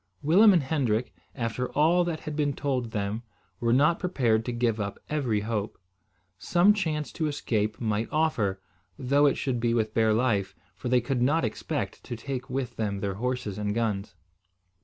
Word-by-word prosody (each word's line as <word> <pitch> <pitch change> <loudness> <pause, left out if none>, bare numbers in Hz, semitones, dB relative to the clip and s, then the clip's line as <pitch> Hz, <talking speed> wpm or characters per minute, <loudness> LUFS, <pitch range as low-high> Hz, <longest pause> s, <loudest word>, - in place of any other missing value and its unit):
Willem 195 +9 +7
and 175 -6 +3
Hendrik, 125 -6 0 0.2
after 125 0 -2
all 165 +4 +4
that 165 -2 -3
had 155 - -5
been 145 -2 +1
told 130 -4 -2
them, 105 +1 -2 0.4
were 115 -1 +1
not 145 +7 +4
prepared 120 - +1
to 125 - -2
give 120 -2 0
up 100 -1 -3
every 125 -9 0
hope. 105 -1 -3 0.6
Some 180 - +4
chance 160 -7 -2
to 160 - -2
escape 110 -7 -1
might 110 -1 -1
offer, 115 -12 +1 0.4
though 140 +3 +3
it 140 - +2
should 130 -3 -1
be 115 0 +1
with 110 -2 0
bare 110 -1 +3
life; 110 -5 0 0.2
for 125 - -5
they 125 0 +4
could 125 +1 -1
not 145 +3 +2
expect 110 - -4
to 120 - -5
take 130 +2 -5
with 130 -2 -3
them 100 -3 -2
their 100 -1 -2
horses 120 -2 -3
and 105 0 -1
guns. 110 -4 -2
125 Hz, 180 wpm, -27 LUFS, 110-145 Hz, 0.6 s, Willem